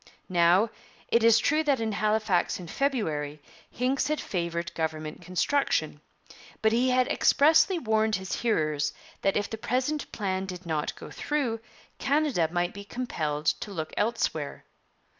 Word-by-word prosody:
Now, 180 Hz, +5 st, +4 dB, 0.4 s
it 235 Hz, -, +3 dB
is 230 Hz, -1 st, +7 dB
true 305 Hz, +7 st, +2 dB
that 280 Hz, -4 st, +2 dB
in 225 Hz, -1 st, -1 dB
Halifax 210 Hz, -4 st, +1 dB
in 180 Hz, -, -7 dB
February 160 Hz, -, -1 dB, 0.3 s
Hincks 255 Hz, +4 st, 0 dB
had 305 Hz, 0 st, 0 dB
favoured 170 Hz, -1 st, -3 dB
government 155 Hz, -1 st, -3 dB
construction; 185 Hz, -, 0 dB, 0.6 s
but 220 Hz, -, +5 dB
he 245 Hz, +3 st, +3 dB
had 255 Hz, 0 st, +3 dB
expressly 315 Hz, +5 st, +4 dB
warned 220 Hz, -6 st, +1 dB
his 190 Hz, 0 st, -3 dB
hearers 155 Hz, -10 st, +1 dB, 0.3 s
that 195 Hz, -, +2 dB
if 205 Hz, -, 0 dB
the 220 Hz, -, -6 dB
present 260 Hz, +6 st, -1 dB
plan 190 Hz, -3 st, -2 dB
did 180 Hz, -1 st, -7 dB
not 155 Hz, -2 st, -2 dB
go -, -, -10 dB
through, 270 Hz, -7 st, -1 dB, 0.4 s
Canada 280 Hz, -, +2 dB
might 175 Hz, 0 st, 0 dB
be 200 Hz, -, -8 dB
compelled 160 Hz, -11 st, -3 dB, 0.2 s
to -, -, -5 dB
look 160 Hz, -5 st, -5 dB
elsewhere. 205 Hz, -10 st, -1 dB
210 Hz, 145 wpm, -28 LUFS, 170-250 Hz, 0.6 s, is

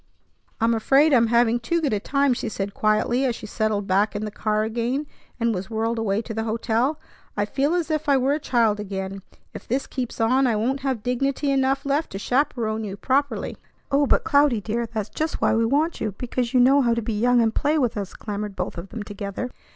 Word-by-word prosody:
"I'm 230 Hz, 0 st, +3 dB
afraid 275 Hz, +7 st, +4 dB
I'm 235 Hz, -3 st, +5 dB
having 235 Hz, 0 st, +3 dB
too 335 Hz, +9 st, 0 dB
good 290 Hz, -8 st, 0 dB
a 210 Hz, -, +1 dB
time," 275 Hz, +4 st, +1 dB
she -, -, -3 dB
said 200 Hz, -1 st, -4 dB
quietly 215 Hz, +4 st, +1 dB
as 250 Hz, -3 st, +1 dB
she -, -, -9 dB
settled 215 Hz, -1 st, -1 dB
back 200 Hz, +3 st, +1 dB
in 210 Hz, +1 st, -2 dB
the 210 Hz, -, -5 dB
car 215 Hz, +1 st, 0 dB
again, 235 Hz, +6 st, -1 dB, 0.3 s
and 230 Hz, -1 st, +1 dB
was 190 Hz, 0 st, -4 dB
whirled 225 Hz, +1 st, -1 dB
away 215 Hz, 0 st, 0 dB
to 225 Hz, -, -6 dB
the 220 Hz, 0 st, -2 dB
hotel. 230 Hz, +6 st, 0 dB, 0.4 s
"I 205 Hz, -, +1 dB
feel 285 Hz, +9 st, 0 dB
as 335 Hz, -3 st, -1 dB
if 310 Hz, -1 st, -1 dB
I 275 Hz, -, +5 dB
were 265 Hz, +2 st, +2 dB
a 300 Hz, -, -1 dB
child 230 Hz, -7 st, +1 dB
again. 195 Hz, -1 st, -5 dB, 0.3 s
If -, -, -9 dB
this 260 Hz, +4 st, -1 dB
keeps 250 Hz, -3 st, -5 dB
on, 255 Hz, +4 st, +3 dB
I 230 Hz, -, +1 dB
won't 250 Hz, +6 st, 0 dB
have 260 Hz, -5 st, -2 dB
dignity 275 Hz, +3 st, 0 dB
enough 270 Hz, 0 st, +1 dB
left 285 Hz, +3 st, 0 dB
to -, -, -3 dB
chaperon 225 Hz, -2 st, 0 dB
you 200 Hz, -2 st, -5 dB
properly." 280 Hz, +5 st, -1 dB, 0.3 s
"Oh, 280 Hz, +1 st, +3 dB
but -, -, +3 dB
Cloudy, 285 Hz, -5 st, +3 dB
dear, 230 Hz, +3 st, -2 dB
that's 220 Hz, -2 st, -4 dB
just 315 Hz, +1 st, -3 dB
why -, -, +2 dB
we 225 Hz, +1 st, +2 dB
want 300 Hz, +7 st, 0 dB
you, 210 Hz, -3 st, -2 dB
because 245 Hz, -1 st, -2 dB
you 255 Hz, -, +3 dB
know 270 Hz, +3 st, +6 dB
how 235 Hz, -3 st, +2 dB
to 235 Hz, -, -1 dB
be 225 Hz, -, -2 dB
young 240 Hz, +3 st, +3 dB
and 225 Hz, -1 st, +2 dB
play 300 Hz, +2 st, +1 dB
with 250 Hz, -6 st, +1 dB
us," 200 Hz, -2 st, -5 dB
clamored 210 Hz, -1 st, -5 dB
both 180 Hz, -2 st, -4 dB
of 185 Hz, +3 st, -8 dB
them 225 Hz, -2 st, -6 dB
together. 205 Hz, +4 st, -5 dB
235 Hz, 230 wpm, -23 LUFS, 215-270 Hz, 0.4 s, know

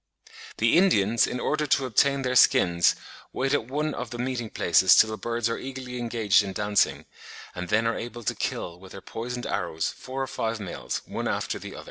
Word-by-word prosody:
The 115 Hz, +9 st, +4 dB
Indians, 115 Hz, -, +3 dB
in 125 Hz, -, -4 dB
order 150 Hz, +2 st, -1 dB
to 135 Hz, -1 st, +2 dB
obtain 140 Hz, +3 st, +2 dB
their 125 Hz, 0 st, -1 dB
skins, 85 Hz, -7 st, +4 dB, 0.4 s
wait 135 Hz, +2 st, 0 dB
at 120 Hz, -6 st, 0 dB
one 150 Hz, +3 st, -2 dB
of 125 Hz, -2 st, -5 dB
the 120 Hz, -, -7 dB
meeting 120 Hz, -2 st, -3 dB
places 95 Hz, 0 st, +4 dB
till 110 Hz, -, +5 dB
the -, -, -3 dB
birds 115 Hz, +2 st, -2 dB
are 115 Hz, -, -2 dB
eagerly 130 Hz, -2 st, -6 dB
engaged 115 Hz, -4 st, +2 dB
in 100 Hz, -1 st, -5 dB
dancing, 105 Hz, +1 st, +1 dB, 0.5 s
and 90 Hz, 0 st, -6 dB
then 110 Hz, +2 st, +2 dB
are 115 Hz, -, +1 dB
able 120 Hz, 0 st, -7 dB
to -, -, 0 dB
kill 85 Hz, 0 st, -4 dB
with 95 Hz, 0 st, -13 dB
their 95 Hz, -, -9 dB
poisoned 120 Hz, +4 st, -6 dB
arrows 80 Hz, -2 st, -2 dB
four 135 Hz, +1 st, -6 dB
or -, -, -1 dB
five 115 Hz, -3 st, -3 dB
males, 95 Hz, -4 st, -5 dB
one -, -, -4 dB
after -, -, -2 dB
the -, -, -9 dB
other. -, -, -8 dB
115 Hz, 205 wpm, -26 LUFS, 105-130 Hz, 0.5 s, till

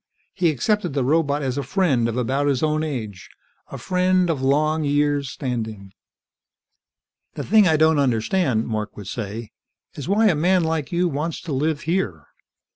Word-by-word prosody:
He 175 Hz, -, +2 dB
accepted 175 Hz, -, 0 dB
the 135 Hz, -, +1 dB
robot 145 Hz, +1 st, +1 dB
as 130 Hz, +1 st, -2 dB
a -, -, 0 dB
friend, 140 Hz, -, +1 dB
of 115 Hz, -, -4 dB
about 135 Hz, +4 st, 0 dB
his 140 Hz, -2 st, 0 dB
own 155 Hz, 0 st, +1 dB
age. 110 Hz, -11 st, -5 dB, 0.4 s
A -, -, -8 dB
friend 185 Hz, -1 st, +1 dB
of 145 Hz, -5 st, -3 dB
long 155 Hz, +4 st, +1 dB
years' 145 Hz, -1 st, +1 dB
standing. 110 Hz, -8 st, -5 dB, 1.4 s
"The -, -, -4 dB
thing 215 Hz, -3 st, +5 dB
I 160 Hz, -2 st, +3 dB
don't 160 Hz, -1 st, +4 dB
understand," 125 Hz, -, +1 dB
Mark 110 Hz, -2 st, -4 dB
would 105 Hz, -, -8 dB
say, 110 Hz, +2 st, -6 dB, 0.4 s
"is 145 Hz, +1 st, -7 dB
why 215 Hz, +3 st, +3 dB
a 205 Hz, -, +5 dB
man 180 Hz, +4 st, +2 dB
like 160 Hz, -3 st, -2 dB
you 175 Hz, +1 st, +1 dB
wants 155 Hz, +1 st, -3 dB
to 160 Hz, -, -5 dB
live 150 Hz, +3 st, 0 dB
here. 150 Hz, -, -2 dB
145 Hz, 170 wpm, -22 LUFS, 125-165 Hz, 1.4 s, thing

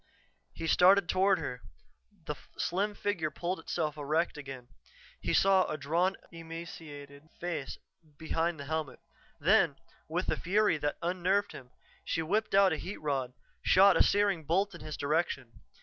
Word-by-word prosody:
He -, -, -6 dB
started 180 Hz, +3 st, +5 dB
toward 190 Hz, +2 st, +3 dB
her; 125 Hz, -7 st, -5 dB, 0.6 s
the -, -, -2 dB, 0.2 s
slim 205 Hz, +4 st, -1 dB
figure 185 Hz, -8 st, -1 dB
pulled 175 Hz, +4 st, -3 dB
itself 155 Hz, -3 st, -3 dB
erect 155 Hz, +4 st, 0 dB
again. 135 Hz, -4 st, -9 dB, 0.5 s
He -, -, -2 dB
saw 190 Hz, -1 st, +4 dB
a 155 Hz, -, -3 dB
drawn, 170 Hz, +6 st, +1 dB, 0.2 s
emaciated 160 Hz, -3 st, -9 dB
face 165 Hz, -6 st, -4 dB, 0.4 s
behind 165 Hz, 0 st, -1 dB
the 140 Hz, -, -6 dB
helmet. 155 Hz, -3 st, -3 dB, 0.4 s
Then, 170 Hz, -2 st, +4 dB, 0.3 s
with 175 Hz, +4 st, -2 dB
a -, -, +1 dB
fury 200 Hz, -2 st, +2 dB
that 145 Hz, 0 st, -2 dB
unnerved 185 Hz, +3 st, +1 dB
him, 125 Hz, -, -11 dB, 0.3 s
she 165 Hz, -, -1 dB
whipped 205 Hz, +6 st, 0 dB
out 195 Hz, -3 st, +6 dB
a -, -, -2 dB
heat 190 Hz, -, -6 dB
rod, 135 Hz, -4 st, -2 dB, 0.3 s
shot 195 Hz, +1 st, +6 dB
a -, -, +3 dB
searing 200 Hz, -5 st, +3 dB
bolt 190 Hz, +6 st, +1 dB
in -, -, -10 dB
his 155 Hz, -1 st, -6 dB
direction. 140 Hz, -5 st, -2 dB
165 Hz, 150 wpm, -31 LUFS, 150-190 Hz, 0.6 s, out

